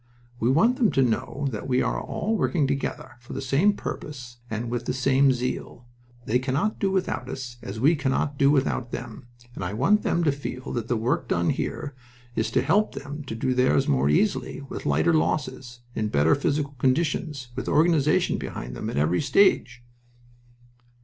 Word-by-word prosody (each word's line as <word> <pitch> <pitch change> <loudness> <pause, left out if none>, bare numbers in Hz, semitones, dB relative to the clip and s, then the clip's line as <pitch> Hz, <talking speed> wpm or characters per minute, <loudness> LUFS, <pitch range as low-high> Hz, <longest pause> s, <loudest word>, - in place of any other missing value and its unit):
"We 115 - +2
want 225 - +4
them 235 -6 +3
to 135 - +4
know 130 +4 -1
that 110 +3 -5
we 125 -1 +2
are - - -1
all 220 +2 -2
working 170 -7 +1
together, 135 -3 -3
for 120 - -11
the - - -4
same 140 +10 +3
purpose 125 -10 -7
and 115 +2 -3
with 120 -1 -2
the - - -2
same 135 +1 +4
zeal. 125 -1 -4 0.4
They 125 +3 +2
cannot 140 +11 -1
do 195 - +1
without 180 -9 -1
us, 125 -2 -6
as 100 +3 -6
we 150 +8 +4
cannot 140 0 -1
do 140 0 +4
without 135 -3 +1
them, 120 -1 -7 0.3
and 95 - -6
I 90 +2 -3
want 195 - +3
them 170 - 0
to 150 - +3
feel 135 -2 -6
that 115 -2 -3
the 120 - 0
work 115 +3 0
done 85 0 +1
here 145 - -3 0.4
is 110 - 0
to - - +1
help 210 +2 +2
them 145 +2 -6
to 115 - -5
do 130 +3 0
theirs 130 +2 +3
more 70 0 +2
easily, 75 - +1
with - - -7
lighter 80 +4 +3
losses, 120 - -1
in 110 - -1
better 75 -5 +3
physical 145 -1 0
conditions, 145 0 0
with 130 - -4
organization 150 -1 +3
behind - - -6
them - - -4
at - - -4
every 75 +5 +2
stage." 135 -5 +3
130 Hz, 185 wpm, -25 LUFS, 120-145 Hz, 0.4 s, want